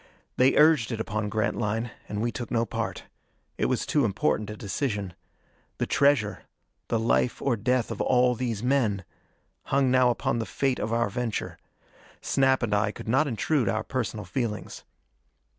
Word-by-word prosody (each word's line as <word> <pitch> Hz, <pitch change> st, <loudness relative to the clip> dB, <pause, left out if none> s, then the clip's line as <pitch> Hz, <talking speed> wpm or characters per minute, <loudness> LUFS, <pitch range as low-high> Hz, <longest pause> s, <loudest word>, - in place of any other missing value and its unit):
They 130 Hz, +1 st, +4 dB
urged 150 Hz, -6 st, +5 dB
it 115 Hz, -, -3 dB
upon 105 Hz, -1 st, -2 dB
Grantline, 110 Hz, +1 st, -1 dB, 0.2 s
and 105 Hz, +1 st, -2 dB
we 120 Hz, -, 0 dB
took 115 Hz, +2 st, -6 dB
no 115 Hz, -1 st, +1 dB
part. 115 Hz, -5 st, -4 dB, 0.6 s
It -, -, +2 dB
was -, -, 0 dB
too 145 Hz, -, +2 dB
important 105 Hz, 0 st, 0 dB
a 105 Hz, -, -6 dB
decision. 100 Hz, -3 st, -3 dB, 0.6 s
The -, -, 0 dB
treasure 130 Hz, -9 st, +2 dB, 0.5 s
the 115 Hz, -, +1 dB
life 115 Hz, +2 st, +1 dB
or 135 Hz, -4 st, +1 dB
death 125 Hz, +3 st, 0 dB
of -, -, -4 dB
all 125 Hz, 0 st, +3 dB
these 115 Hz, -3 st, -3 dB
men 115 Hz, -8 st, +1 dB, 0.6 s
hung 135 Hz, -2 st, +2 dB
now 130 Hz, -1 st, +5 dB
upon 120 Hz, 0 st, 0 dB
the 115 Hz, -, -3 dB
fate 135 Hz, -2 st, 0 dB
of 110 Hz, -, -2 dB
our 115 Hz, -3 st, +1 dB
venture. 120 Hz, -1 st, -3 dB, 0.6 s
Snap 135 Hz, -2 st, +2 dB
and 110 Hz, -3 st, 0 dB
I 105 Hz, +1 st, +2 dB
could -, -, -10 dB
not 135 Hz, +7 st, +3 dB
intrude 130 Hz, +2 st, 0 dB
our 110 Hz, -, -1 dB
personal 110 Hz, -6 st, -3 dB
feelings. 110 Hz, +1 st, -4 dB
115 Hz, 165 wpm, -27 LUFS, 105-130 Hz, 0.6 s, urged